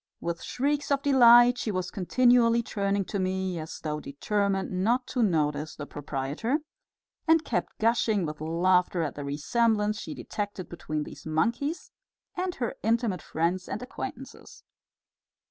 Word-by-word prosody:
With 170 0 -3
shrieks 285 +3 -1
of 280 0 +1
delight 245 -3 +7
she - - -2
was 185 -3 -2
continually 235 +3 +3
turning 200 -2 -1
to 200 - -3
me, 185 -1 -1
as 155 0 -7
though 150 -1 -3
determined 195 +5 -1
not 245 +4 +2
to 250 - -1
notice 155 -6 0
the 145 - -6
proprietor, 145 - -2 0.7
and 320 0 +4
kept 235 - -2
gushing 220 -4 +2
with 150 0 -6
laughter 175 +2 +2
at 150 - -3
the 145 - -6
resemblance 210 +9 +1
she - - -6
detected 205 -4 -5
between 155 -3 -4
these 150 +1 -10
monkeys 235 - -1 0.4
and 365 0 -2
her 240 -3 -2
intimate 225 -5 0
friends 175 +3 -1
and 230 - -4
acquaintances. 255 - -8
200 Hz, 145 wpm, -27 LUFS, 165-235 Hz, 0.7 s, delight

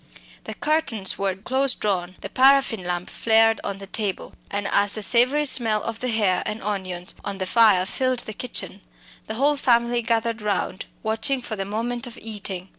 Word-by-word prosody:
The - - -6
curtains 295 -11 0
were 195 -1 0
close 260 +7 0
drawn; 185 -3 -2
the 195 - -6
paraffin 265 -4 +4
lamp 175 0 -3
flared 225 -1 +3
on 200 - -4
the 195 - -9
table, 200 -1 -3 0.2
and 200 0 -3
as 200 0 +3
the 215 - -2
savoury 255 +7 +4
smell 225 -6 +3
of 230 -1 -5
the 255 - -3
hare 210 -6 +2
and 215 +1 -5
onions 185 -3 -4
on 200 -1 -5
the 190 - -3
fire 205 -2 +4
filled 255 +4 -1
the 215 - -7
kitchen, 215 -4 -4 0.5
the 220 - -4
whole 285 +4 +2
family 240 -2 +2
gathered 230 -1 -1
round 200 -1 -2 0.2
watching 225 +5 0
for 235 -3 -6
the 195 -1 -4
moment 235 +4 -3
of 235 - -10
eating. 195 -4 -7
220 Hz, 185 wpm, -23 LUFS, 195-240 Hz, 0.5 s, paraffin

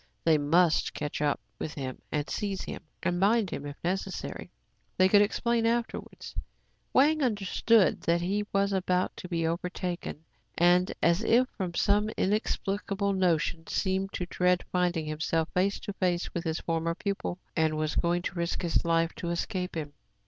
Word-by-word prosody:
They 160 -2 +4
must 165 +3 +3
catch 145 0 -3
up 145 -1 +1 0.2
with 155 - -4
him, 130 -3 -5 0.2
seize 195 +1 -3
him, - - -6 0.2
and 175 -1 0
bind 205 0 +3
him 145 - -4
if 145 - -7
necessary. 190 +1 -3 0.5
They 185 - +6
could 205 +2 +6
explain 230 +2 +1
afterwards. 235 0 -3 0.6
Wang 305 +3 +4
understood 215 -2 +3
that 170 +1 +2
he 205 +4 -1
was 200 0 +1
about 185 -1 0
to 180 - -8
be 165 -2 0
over 170 +2 -1
taken, 175 -4 -5 0.3
and, 175 +1 +4
as 170 +3 +4
if 235 +3 +4
from 180 -3 -5
some 205 +3 +2
inexplicable 200 -1 0
notion, 170 -3 +1
seemed 190 0 0
to 180 - -2
dread 180 0 +1
finding 175 -3 +1
himself 160 +1 -1
face 195 +2 +1
to 205 - -5
face 180 -2 -1
with 170 0 -3
his 160 0 -1
former 165 0 -1
pupil, 195 -1 -3 0.2
and 160 -1 +2
was 155 0 -1
going 175 0 +1
to - - -3
risk 170 +1 -2
his 170 - +1
life 165 0 +2
to 170 - -3
escape 180 +1 -2
him. 150 -2 -5
180 Hz, 165 wpm, -29 LUFS, 165-200 Hz, 0.6 s, They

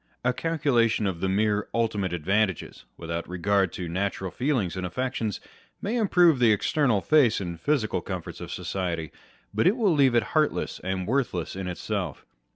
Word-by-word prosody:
A 125 - +3
calculation 125 -8 +1
of 95 -4 -2
the 95 - 0
mere 105 +1 +1
ultimate 105 -5 0
advantages, 95 +2 -1
without 85 0 -5
regard 95 +1 +1
to 90 - -5
natural 95 +1 -2
feelings 125 - -1
and 95 - -4
affections, 115 +2 -2 0.4
may 210 +4 -2
improve 180 - +4
the 120 -2 +5
external 115 0 +2
face 140 -5 +4
and 85 -4 -5
physical 140 -8 0
comforts 90 -3 -6
of - - -7
society, 85 -4 -3 0.4
but - - +2
will 210 -7 +3
leave 135 -5 +4
it 120 - +4
heartless 155 -1 +1
and 95 0 -2
worthless 115 -9 -1
in 95 -1 -4
itself. 90 -3 -4
105 Hz, 160 wpm, -26 LUFS, 90-130 Hz, 0.4 s, the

